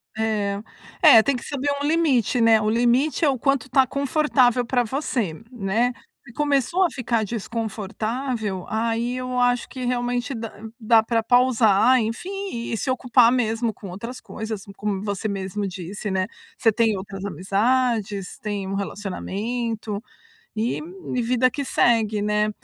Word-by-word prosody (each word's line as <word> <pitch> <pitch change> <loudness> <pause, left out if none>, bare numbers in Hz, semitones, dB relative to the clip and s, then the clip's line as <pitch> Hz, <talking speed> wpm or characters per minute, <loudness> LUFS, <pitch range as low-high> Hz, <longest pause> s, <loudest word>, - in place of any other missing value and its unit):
É, 210 -2 -1 0.4
é, 260 - +9
tem 280 -2 +1
que 245 - -6
saber 285 0 -2
um - - -1
limite, 280 -8 +2
né, 225 -2 +5
o 215 - +1
limite 245 +8 +2
é 285 - +4
o 265 - -1
quanto 275 -1 +1
tá 265 0 +3
confortável 275 -3 +2
pra 245 0 +1
você, 240 - -2 0.2
né. 230 +2 0 0.3
Se 240 - -12
começou 295 +5 +1
a - - +4
ficar 235 -5 -1
desconfortável, 220 0 -3
aí 230 +3 -1
eu 255 0 -2
acho 245 0 +2
que 255 -1 -7
realmente 245 +1 -1
dá 225 -1 -5 0.3
dá 225 0 +4
pra 225 0 +1
pausar, 245 -1 +4
enfim, 230 - -3 0.4
e 225 - -1
se 260 - -3
ocupar 245 -2 +4
mesmo 225 -2 0
com 195 0 -10
outras 230 +8 -7
coisas, 220 -2 -6 0.2
como 205 -2 -2
você 205 0 -2
mesmo 200 0 -3
disse, 190 +3 -5
né. 190 0 0 0.3
Você 225 - +4
tem 225 -1 +2
outras 195 0 -6
amizades, 200 - 0
tem 205 -2 -4
um 195 - -3
relacionamento 210 +2 -3 0.6
e 225 +3 0 0.4
e 245 - +1
vida 250 +2 +2
que 285 - -4
segue, 220 -5 +2
né. 210 0 +1
230 Hz, 155 wpm, -23 LUFS, 210-250 Hz, 0.6 s, é